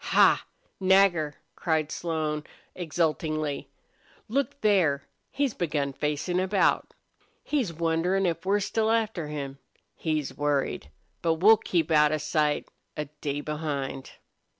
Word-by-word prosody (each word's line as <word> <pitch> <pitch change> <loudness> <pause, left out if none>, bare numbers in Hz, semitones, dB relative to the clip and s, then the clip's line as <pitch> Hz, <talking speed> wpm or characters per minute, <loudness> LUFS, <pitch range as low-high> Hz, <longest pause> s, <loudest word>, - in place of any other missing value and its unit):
"Ha, - - +5 0.3
Nagger!" 185 -6 +4 0.2
cried 155 -3 0
Slone, 155 -3 -2 0.3
exultingly. 155 -3 -1 0.6
"Look 270 +4 -1
there! 175 -10 +3 0.3
He's 275 -4 0
begun 145 -5 -1
facin' 150 +6 -1
about. 190 +1 +1 0.5
He's 265 - 0
wonderin' 170 +4 +1
if 165 -1 -1
we're 200 +2 +2
still 220 +2 0
after 220 -8 0
him. 140 -2 -5 0.3
He's 155 -3 -2
worried.... 145 - -1 0.3
But 165 -1 +2
we'll 210 +7 +7
keep 170 -4 -1
out 150 -1 +5
of 155 -1 -1
sight 150 -1 +1 0.3
a 150 - -2 0.2
day 145 -1 -2
behind." 145 -3 -4
160 Hz, 120 wpm, -27 LUFS, 150-190 Hz, 0.6 s, we'll